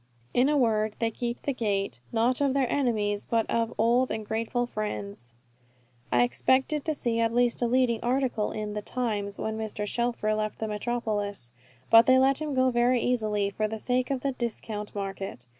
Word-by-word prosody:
In 255 +3 +4
a 300 - +2
word, 220 -4 +1
they 230 -1 0
keep 235 +1 -4
the 280 - -1
gate, 200 - -1
not 240 +3 +2
of 275 -1 +2
their 270 -2 +2
enemies, 215 -7 0
but 225 -1 +1
of 230 -1 +1
old 240 +3 +3
and 215 0 -3
grateful 230 +3 -1
friends. 205 - -5 0.8
I 120 0 +4
expected 260 - +1
to 315 - 0
see 235 -4 -1
at 230 0 +2
least 245 0 +1
a 240 - +2
leading 245 -2 +2
article 245 -3 0
in 210 -1 -4
the 210 - -3
"Times," 210 -4 -2
when 220 0 -3
Mr. 215 -1 -3
Shelfer 235 -1 -1
left 215 0 -2
the 220 - -3
metropolis; 210 - -3 0.4
but 225 +1 +8
they 260 0 +6
let 265 +1 +3
him 300 -3 -2
go 255 0 +3
very 245 +1 +3
easily 215 -5 0
for 215 +2 -1
the 220 +1 -4
sake 250 +3 0
of 270 -2 -1
the 275 - 0
discount 220 -4 -5
market. 195 -9 -5
230 Hz, 190 wpm, -27 LUFS, 210-250 Hz, 0.8 s, but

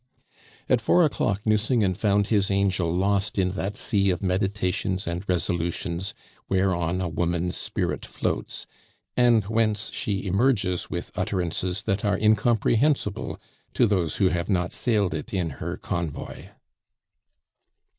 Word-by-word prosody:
At 125 - +3
four 175 +10 +4
o'clock 105 -8 0
Nucingen 110 -2 +2
found 100 +1 +2
his 100 -2 +1
angel 95 -3 +1
lost 100 +3 0
in 95 -1 +2
that 95 +2 -3
sea 100 -2 +1
of 90 +1 -1
meditations 95 0 -1
and 85 +2 -3
resolutions 85 +1 -1 0.3
whereon 90 -2 +1
a 90 - -1
woman's 85 +1 -1
spirit - - -2
floats, - - -3 0.5
and 120 -3 +4
whence 110 0 0
she 100 -1 -2
emerges 100 -2 +1
with 85 - -5
utterances 90 -1 -1
that 95 +3 -1
are 100 -2 +2
incomprehensible 110 +2 +2 0.4
to - - +5
those 95 -7 +1
who 95 - +3
have 85 +1 -2
not 90 -3 +1
sailed 105 -8 +1
it 80 +5 -5
in 85 -4 -1
her - - -3
convoy. 85 -4 -5
95 Hz, 130 wpm, -25 LUFS, 90-105 Hz, 0.5 s, to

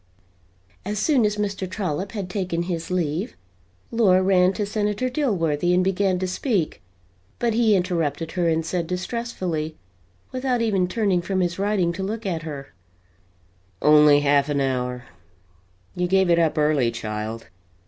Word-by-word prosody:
As 210 +2 -3
soon 255 +1 +3
as 210 - -2
Mr. 200 -3 -2
Trollop 190 0 -3
had 200 -4 -4
taken 180 -3 -2
his 170 -2 -4
leave, 175 +2 -2 0.6
Laura 190 -5 +4
ran 185 -1 +4
to 205 - -2
Senator 210 +4 -1
Dilworthy 180 - +1
and 180 - +3
began 190 0 +1
to 185 - -2
speak, 185 - -1 0.6
but 235 -2 0
he 225 -2 +4
interrupted 165 -4 -1
her 175 -2 +1
and 160 0 0
said 170 0 -2
distressfully, 180 -5 -3 0.6
without 255 -1 -1
even 200 -6 +1
turning 195 -3 +1
from 190 +1 -2
his 175 0 -1
writing 195 -4 +1
to 185 - -5
look 215 +3 -4
at 170 -4 -2
her: 145 -4 -8 1.1
"Only 150 +1 +6
half 145 0 +3
an 145 -1 0
hour! 125 -2 -1 0.9
You 180 0 0
gave 190 -1 +3
it 170 - +4
up 160 -2 +1
early, 150 -5 +2
child. 110 0 -5
180 Hz, 150 wpm, -23 LUFS, 155-205 Hz, 1.1 s, Only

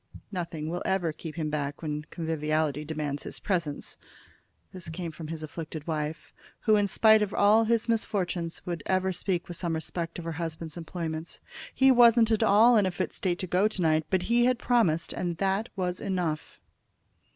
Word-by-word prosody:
"Nothing 170 -5 -4
will 175 +2 -3
ever 175 -4 0
keep 155 0 -8
him 155 -2 -2
back 145 0 -3
when 150 -1 -4
conviviality 155 -2 -1
demands 150 -2 -3
his - - -6
presence." 170 -7 -2 0.8
This 180 -3 -7
came 165 +1 -5
from 155 0 -8
his 160 0 -6
afflicted 155 0 -7
wife, 155 -1 -4 0.3
who, 215 -2 +4
in 205 -1 +3
spite 220 +2 +5
of 205 -1 -1
all 215 +2 +5
his 230 +1 +1
misfortunes, 185 -7 -1
would 170 -3 -3
ever 190 0 +1
speak 180 -1 -2
with 175 - -6
some 170 -3 -2
respect 165 +1 -4
of 170 - -7
her 165 - -2
husband's 165 -1 -5
employments. 165 -1 -5 0.4
"He 265 0 +6
wasn't 235 -2 +6
at 220 - +2
all 225 +2 +6
in 200 -3 +3
a - - +1
fit 175 - -3
state 180 -2 -1
to 185 - -3
go 185 +4 +3
to 215 -4 -3
night, 155 -1 +2
but 185 -1 +1
he 240 +1 +3
had 250 0 +3
promised, 220 -11 +1
and 175 -2 -3
that 195 +4 0
was 180 -2 -2
enough." 175 -5 -3
175 Hz, 185 wpm, -28 LUFS, 160-200 Hz, 0.8 s, He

